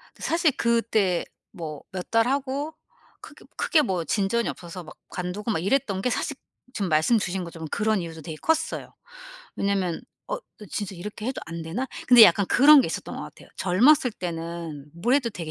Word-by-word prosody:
그 - - -15
사실 330 -3 +2
그때 225 -6 +1 0.3
뭐 155 -4 -7
몇 185 -1 -6
달 225 +1 +3
하고 280 +3 -2 0.5
크게 - - -14
크게 310 -4 +3
뭐 180 - -1
진전이 215 +5 0
없어서 175 0 -7
막 155 - -13
관두고 185 +5 -4
막 205 - +1
이랬던 195 -3 0
게 250 - +1
사실 280 +2 -2 0.4
지금 195 -4 -1
말씀 160 +9 +3
주신 185 -2 -2
것처럼 165 -1 -8
그런 215 -1 +1
이유도 165 -2 -7
되게 155 +1 -7
컸어요. 320 0 -1 0.6
왜냐면 195 -4 -1 0.3
'어 - - -1 0.3
진짜 200 -2 -4
이렇게 210 +4 -7
해도 260 - -3
안 165 0 -6
되나?' 195 +12 -3 0.2
근데 245 -2 +10
약간 190 +1 +4
그런 285 +2 +8
게 - - 0
있었던 - - -5
것 - - -5
같아요. - - -12
젊었을 245 +7 +4
때는 165 -4 -6
뭘 235 +10 +1
해도 250 -5 +1
되게 165 -5 -6
200 Hz, 345 characters per minute, -25 LUFS, 170-245 Hz, 0.6 s, 근데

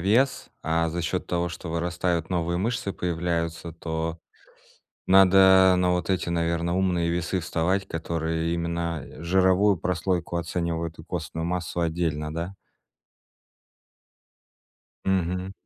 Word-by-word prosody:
вес, 115 +9 +2
а 80 +1 +1
за 85 +2 -3
счет 90 +3 -2
того, 85 0 0
что 85 +1 -7
вырастают 85 0 -1
новые 85 -1 0
мышцы, 110 -1 -1
появляются, 85 -1 -2
то 80 0 -4 0.9
надо 95 0 +7
на 90 0 +2
вот 90 +1 -1
эти, 90 -2 0
наверно, 85 +1 0
умные 90 -3 +1
весы 85 +2 -1
вставать, 90 +3 0
которые 80 0 -2
именно 85 -2 -2 0.2
жировую 95 +3 +4
прослойку 85 0 -1
оценивают 85 -1 -2
и 80 - -10
костную 80 -1 -4
массу 90 0 -2
отдельно, 80 -2 -1
да? 85 +4 -4 2.5
Мгм. 90 0 0
85 Hz, 115 wpm, -26 LUFS, 85-90 Hz, 2.5 s, надо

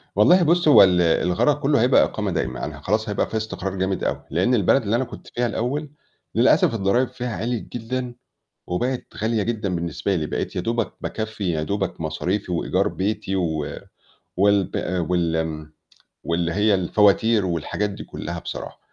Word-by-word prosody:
والله 175 - +6
بُصّي 170 0 +3
هو 145 - +9
ال 90 -2 +4
الغرض 90 - +2
كلّه 140 -3 +2
هيبقى 125 +3 +5
إقامة - - -2
دايمة، - - -2
أنا - - -7
ه - - -17
خلاص 110 +2 0
هيبقى 105 - 0
في 110 - -2
استقرار 100 -3 -4
جامد 95 0 -1
أوي، - - -2
لإن 90 - +1
البلد 115 +5 +3
اللي 105 +2 0
أنا 125 - +1
كنت - - -11
فيها 120 - -2
الأوّل 135 +7 -2 0.5
للأسف - - +4
الضرايب 115 +4 +1
فيها 120 -3 -5
عِليت 115 +4 -3
جدًا 125 +1 -4 0.5
وبقت 125 +8 -2
غالية 110 0 0
جدًا 105 -5 -2
بالنسبة 85 +3 -2
لي، 80 -3 -1
بقيت - - -3
يا - - -1
دوبَك 115 +3 -1
باكفّي 110 -4 -3
يا 80 -2 -1
دوبَك 100 0 -3
مصاريفي 90 +5 -2
وإيجار 95 +3 0
بيتي، 100 0 -2
و 80 -5 -1 0.7
والب 100 0 +2 0.3
وال 80 -3 -1 0.5
واللي 85 0 -1
هي 105 +1 +3
الفواتير 105 +3 +3
والحاجات 90 +4 -2
دي 100 - -8
كلّها - - -6
بصراحة. - - -7
100 Hz, 170 wpm, -23 LUFS, 90-115 Hz, 0.7 s, هو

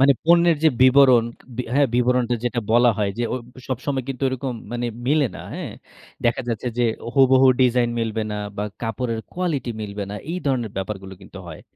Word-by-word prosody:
মানে 140 +1 +6
পণ্যের 170 -1 +5
যে - - +8
বিবরণ, 130 -3 +6 0.5
হ্যাঁ, 145 0 +4
বিবরণটা 125 0 +2
যেটা 120 0 0
বলা 120 +1 +5
হয় 100 -2 +1
যে, - - 0
অ - - 0 0.3
সবসময় 130 0 -2
কিন্তু 135 -1 -5
ওরকম 130 0 -3 0.2
মানে 120 0 -2 0.2
মিলে 145 -1 +3
না, - - -9
হ্যাঁ। - - -5 0.5
দেখা 120 +2 +2
যাচ্ছে 115 +2 -2
যে, - - +3 0.3
হুবহু 130 -1 +5
ডিজাইন 125 -1 +3
মিলবে 110 -1 -2
না - - -3 0.2
বা 105 - -2 0.2
কাপড়ের 115 0 -2
কোয়ালিটি 160 -9 -2
মিলবে 100 -1 -5
না। - - -5 0.2
এই 180 - -2
ধরনের 120 -6 0
ব্যাপারগুলো 95 0 -5
কিন্তু 95 0 -12
হয়। 80 - -10
125 Hz, 180 wpm, -22 LUFS, 115-135 Hz, 0.5 s, যে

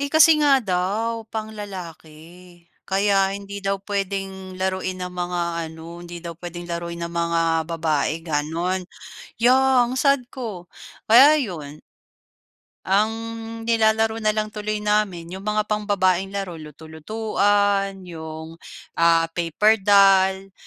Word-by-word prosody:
Eh, 280 0 -2
kasi 320 +1 +7
nga 280 -2 +5
daw, 215 +3 -1
pang 220 0 -5
lalaki. 175 -3 -10 0.2
Kaya 195 0 +2
hindi 200 0 -7
daw 195 0 +1
puwedeng 195 -1 -4
laruin 185 0 -2
ng 180 0 -5
mga 175 0 -2 0.3
ano, 160 0 -11
hindi 175 0 -9
daw 170 0 -6
puwedeng 175 0 -8
laruin 170 0 -4
ng 170 0 -5
mga 170 0 0 0.3
babae 155 -3 0
gano'n. 165 +4 -2 0.6
Ya, 255 +1 +5
ang 250 +2 -3
sad 275 -4 +2
ko. 205 -9 -7 0.4
Kaya 275 +7 +8
yun. 160 - -4 1.0
Ang 210 +3 +2 0.5
nilalaro 225 0 +2
na 215 - 0
lang 215 0 -2
tuloy 210 0 -3
namin 210 -5 0
'yong 190 - -6
mga 210 +1 0
pambabaeng 200 -3 +1
laro, 195 -2 -4
luto-lutuan, 195 +5 -1
'yong 160 -1 -9 0.4
ah, 165 0 +5
paper 180 +6 +2
doll, 195 -1 +4
195 Hz, 125 wpm, -22 LUFS, 170-215 Hz, 1.0 s, Kaya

